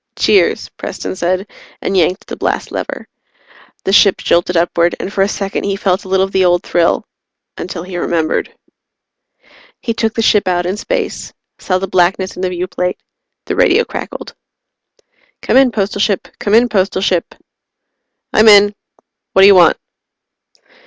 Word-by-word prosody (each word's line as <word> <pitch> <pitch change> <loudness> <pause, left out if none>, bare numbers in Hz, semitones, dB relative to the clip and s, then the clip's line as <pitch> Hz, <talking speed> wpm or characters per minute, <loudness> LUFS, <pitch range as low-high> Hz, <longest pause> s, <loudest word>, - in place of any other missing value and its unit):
"Cheers," 400 - +2
Preston - - -6
said, 185 +2 -1 0.3
and 195 - -3
yanked 185 +2 +1
the - - -7
blast - - -3
lever. - - -5 0.8
The 195 - -1
ship 200 -1 +5
jolted 175 +1 +1
upward, 170 0 +1
and 200 - -5
for 195 - 0
a 195 - +3
second 200 -1 -3
he 200 -1 -1
felt 195 0 -1
a - - -9
little 190 0 +2
of 195 - -10
the 190 -1 +2
old 175 0 +2
thrill 170 -1 +1 0.5
until 175 -1 -6
he 180 -1 -7
remembered. 165 -2 -1 1.3
He 230 - -3
took 225 -1 -2
the 225 - 0
ship 210 -3 +3
out 175 -1 0
in 185 +2 -2
space, - - -4 0.3
saw 185 - -1
the 195 +1 -4
blackness 185 +1 0
in - - -7
the 185 - 0
viewplate. 180 0 -3 0.5
The - - -3
radio 470 -2 +3
crackled. - - -7 1.1
"Come - - 0
in, 265 -1 +6
Postal 205 -1 -2
Ship. 200 -3 0
Come 205 +1 +1
in, 240 +2 +5
Postal 190 -3 0
Ship." 180 -3 -1 1.0
"I'm 215 +1 +4
in. 205 -1 +7 0.6
What 190 - +5
do - - +9
you 200 - +8
want?" 180 -2 +5
190 Hz, 165 wpm, -15 LUFS, 180-205 Hz, 1.3 s, do